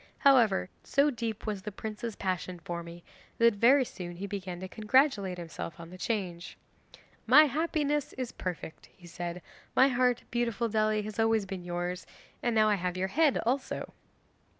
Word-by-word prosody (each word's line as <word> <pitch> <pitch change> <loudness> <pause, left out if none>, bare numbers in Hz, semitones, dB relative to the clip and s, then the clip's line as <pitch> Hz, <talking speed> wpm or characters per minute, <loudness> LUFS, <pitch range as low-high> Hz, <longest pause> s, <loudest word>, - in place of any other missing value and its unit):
However, 240 -10 +4 0.2
so 285 +2 +3
deep 230 -4 -4
was 210 -3 -3
the 210 - -6
prince's 215 +2 -5
passion 185 -1 -3
for 170 0 -5
me, 170 0 -10 0.3
that 230 0 +5
very 250 +6 +5
soon 175 -6 -7
he 190 +3 -5
began 190 -3 -5
to 190 - -5
congratulate 215 -2 +2
himself 170 +1 -7
on 170 0 -10
the 185 - -9
change. 180 -5 -3 0.7
"My 280 +6 +9
happiness 295 0 0
is 255 -2 -4
perfect," 175 -3 -6
he 180 - -16
said; 175 +1 -6 0.3
"my 265 +1 +6
heart, 250 -1 +2
beautiful 235 -1 0
Dely, 215 0 +1
has 215 +1 -7
always 225 -2 +3
been 190 -2 -6
yours, 175 +1 -4 0.3
and 240 -2 0
now 215 -1 +5
I 210 - +4
have 180 0 -2
your 190 +1 -1
head 305 +3 +3
also." 260 +3 -2
210 Hz, 170 wpm, -30 LUFS, 180-245 Hz, 0.7 s, My